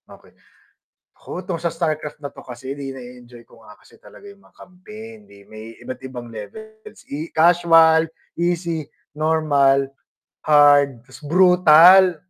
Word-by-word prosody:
Okey -, -, -18 dB, 1.0 s
oh, -, -, -5 dB
'tong 180 Hz, -3 st, -6 dB
sa 170 Hz, -1 st, -2 dB
Starcraft 155 Hz, -3 st, -5 dB
na 145 Hz, -, -7 dB
'to -, -, -15 dB
kasi 130 Hz, +2 st, -9 dB
di 140 Hz, -1 st, -7 dB
na-e-enjoy 125 Hz, -2 st, -14 dB
ko 115 Hz, -, -21 dB
nga 105 Hz, -1 st, -17 dB
kasi -, -, -23 dB
talaga 205 Hz, -, -17 dB
yung 200 Hz, 0 st, -17 dB
mga -, -, -27 dB
campaign 215 Hz, +5 st, -13 dB
di 100 Hz, -, -20 dB
may 110 Hz, +1 st, -13 dB
iba't 125 Hz, +1 st, -9 dB
ibang 125 Hz, -2 st, -9 dB
levels 215 Hz, -, -13 dB
i 155 Hz, +4 st, -7 dB
casual, 165 Hz, -1 st, +4 dB, 0.3 s
easy, 170 Hz, -2 st, -3 dB, 0.3 s
normal, 145 Hz, -3 st, +1 dB, 0.6 s
hard, 145 Hz, -4 st, +3 dB, 0.2 s
brutal. 180 Hz, +1 st, +5 dB
155 Hz, 135 wpm, -19 LUFS, 130-175 Hz, 1.0 s, brutal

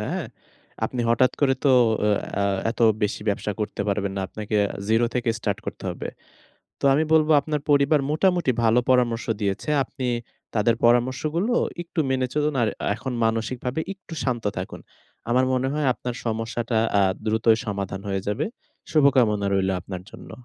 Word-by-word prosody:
হ্যাঁ? -, -, -3 dB, 0.6 s
আপনি 125 Hz, -, -2 dB
হঠাৎ 125 Hz, +2 st, +3 dB
করে 135 Hz, -2 st, +4 dB
তো -, -, +5 dB, 0.4 s
আ 105 Hz, -, +3 dB, 0.2 s
অ্যা 100 Hz, -, 0 dB, 0.3 s
এত 120 Hz, -, -8 dB, 0.2 s
বেশি 105 Hz, +1 st, 0 dB
ব্যবসা 105 Hz, +1 st, -1 dB
করতে 105 Hz, -1 st, -3 dB
পারবেন 100 Hz, -1 st, -1 dB
না। -, -, -1 dB
আপনাকে 105 Hz, +2 st, -6 dB
এ -, -, +1 dB, 0.2 s
জিরো 115 Hz, +2 st, +3 dB
থেকে 125 Hz, -1 st, -1 dB
স্টার্ট -, -, -2 dB
করতে -, -, -6 dB
হবে। -, -, -6 dB, 0.7 s
তো -, -, -19 dB
আমি 150 Hz, +3 st, +3 dB
বলবো, 155 Hz, 0 st, +4 dB
আপনার 150 Hz, 0 st, -2 dB
পরিবার 145 Hz, +1 st, +4 dB
মোটামুটি 175 Hz, -3 st, +2 dB
ভালো 115 Hz, +2 st, +4 dB
পরামর্শ 120 Hz, -2 st, +2 dB, 0.2 s
দিয়েছে। 100 Hz, +7 st, -2 dB
আপনি 130 Hz, 0 st, -6 dB, 0.5 s
তাদের 110 Hz, +2 st, +3 dB
পরামর্শগুলো 130 Hz, -, +2 dB, 0.3 s
একটু 170 Hz, -1 st, -5 dB
মেনে 130 Hz, -1 st, +1 dB
চলুন। 150 Hz, 0 st, +1 dB
আর 115 Hz, -, +3 dB, 0.2 s
আ -, -, -1 dB
এখন 130 Hz, +3 st, -5 dB
মানসিকভাবে 120 Hz, +4 st, -1 dB
একটু 195 Hz, -3 st, -13 dB
শান্ত 120 Hz, -4 st, -1 dB
থাকুন। 90 Hz, +1 st, -5 dB, 0.5 s
আমার 130 Hz, +2 st, +3 dB
মনে 130 Hz, +1 st, +1 dB
হয় 150 Hz, -2 st, 0 dB
আপনার 125 Hz, -1 st, -5 dB
সমস্যাটা 115 Hz, +1 st, -2 dB, 0.2 s
আ -, -, +4 dB, 0.2 s
দ্রুতই 110 Hz, +1 st, +3 dB
সমাধান 100 Hz, -2 st, -4 dB
হয়ে 95 Hz, -1 st, -1 dB
যাবে। 110 Hz, +9 st, 0 dB, 0.5 s
শুভকামনা 125 Hz, -9 st, +3 dB
রইলো 95 Hz, -1 st, +1 dB
আপনার 95 Hz, 0 st, -7 dB
জন্য। -, -, -12 dB
120 Hz, 165 wpm, -24 LUFS, 105-140 Hz, 0.7 s, তো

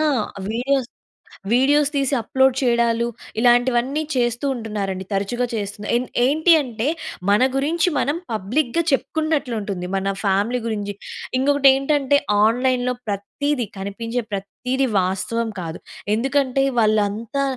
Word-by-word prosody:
ఆ! -, -, +2 dB, 0.5 s
Videos, 255 Hz, +2 st, 0 dB, 0.7 s
videos 285 Hz, +3 st, +4 dB
తీసి 275 Hz, 0 st, +1 dB
upload 265 Hz, +3 st, +2 dB
చేయడాలు. 235 Hz, -2 st, +2 dB, 0.3 s
ఇలాంటివన్నీ 245 Hz, +4 st, +3 dB
చేస్తూ 240 Hz, 0 st, 0 dB
ఉంటున్నారండి, 205 Hz, -5 st, -4 dB
తరచుగా 200 Hz, +6 st, 0 dB
చేస్తున్నారు. 205 Hz, -1 st, -4 dB
ఏం 245 Hz, -, -1 dB, 0.2 s
ఏంటి 315 Hz, +6 st, +3 dB
అంటే 240 Hz, -2 st, -3 dB, 0.4 s
మన 205 Hz, +3 st, +4 dB
గురించి 325 Hz, +6 st, +1 dB
మనం 290 Hz, +3 st, 0 dB
పబ్లిక్‌గా 240 Hz, -, 0 dB
చెప్పుకున్నట్లు 285 Hz, -1 st, 0 dB
ఉంటుంది. 195 Hz, -3 st, -4 dB
మన 195 Hz, +1 st, 0 dB
ఫ్యామిలీ 205 Hz, +5 st, +1 dB
గురించి. 205 Hz, -2 st, -3 dB, 0.5 s
ఇంకొకటేంటంటే 275 Hz, +1 st, +3 dB, 0.3 s
ఆన్‌లైన్‌లో 250 Hz, +2 st, +2 dB
ప్రతీది, 235 Hz, +6 st, -2 dB
కనిపించే 230 Hz, +5 st, -3 dB
ప్రతీది 250 Hz, +7 st, -2 dB
వాస్తవం 190 Hz, +5 st, -1 dB
కాదు. 165 Hz, -1 st, -6 dB, 0.4 s
ఎందుకంటే 270 Hz, +2 st, +1 dB, 0.2 s
వాళ్ళంతా 215 Hz, +5 st, +1 dB
245 Hz, 110 wpm, -21 LUFS, 210-275 Hz, 0.7 s, Videos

